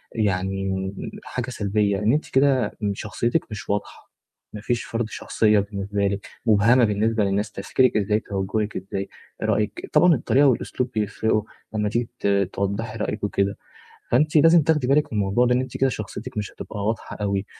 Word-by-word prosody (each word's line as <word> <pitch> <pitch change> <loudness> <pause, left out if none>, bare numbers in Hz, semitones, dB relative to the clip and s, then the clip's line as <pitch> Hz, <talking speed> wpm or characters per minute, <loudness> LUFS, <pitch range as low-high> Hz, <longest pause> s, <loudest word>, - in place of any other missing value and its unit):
يعني 95 -2 -1 0.3
حاجة 125 0 -4
سلبية، 105 -3 0
إن 105 +4 +2
أنتِ 150 - -1
كده 130 -5 +2 0.2
شخصيتِك 120 +8 -1
مش 105 - -7
واضحة. 100 +1 -4 0.4
ما 105 - -7
فيش 120 +1 -1
فرض 115 0 -2
شخصية 105 -1 +2
بالنسبة 100 0 -2
لِك، 100 0 -3 0.2
مبهمة 115 +3 +5
بالنسبة 110 +1 +1
للناس، 100 +2 0
تفكيرِك 110 +4 +1
إزاي 105 +1 +1
توجهِك 105 +1 -2
إزاي، 95 +1 -5 0.3
رأيِك 105 -1 -1
طبعًا 175 -1 +6
الطريقة 140 +2 +3
والأسلوب 125 0 0
بيفرقوا 110 0 0 0.3
لمّا 105 -1 0
تيجي 120 +2 -1
ت - - -1 0.3
توضَّحي 100 +3 -2
رأيِك 105 0 -3
وكده، 100 0 0 0.5
فأنتِ 150 +6 +2
لازم 165 +2 +7
تاخدي 150 -4 +1
بالِك 145 -1 +2
من 105 - 0
الموضوع 100 +5 +2
ده 125 - +3
لأن 125 - +2
أنتِ 130 - -6
كده 135 - +3
شخصيتِك 115 +2 -6
مش 105 -1 -3
هتبقى 100 -2 -6
واضحة 110 0 -3
أوي. 100 -1 -1
105 Hz, 165 wpm, -23 LUFS, 100-120 Hz, 0.5 s, لازم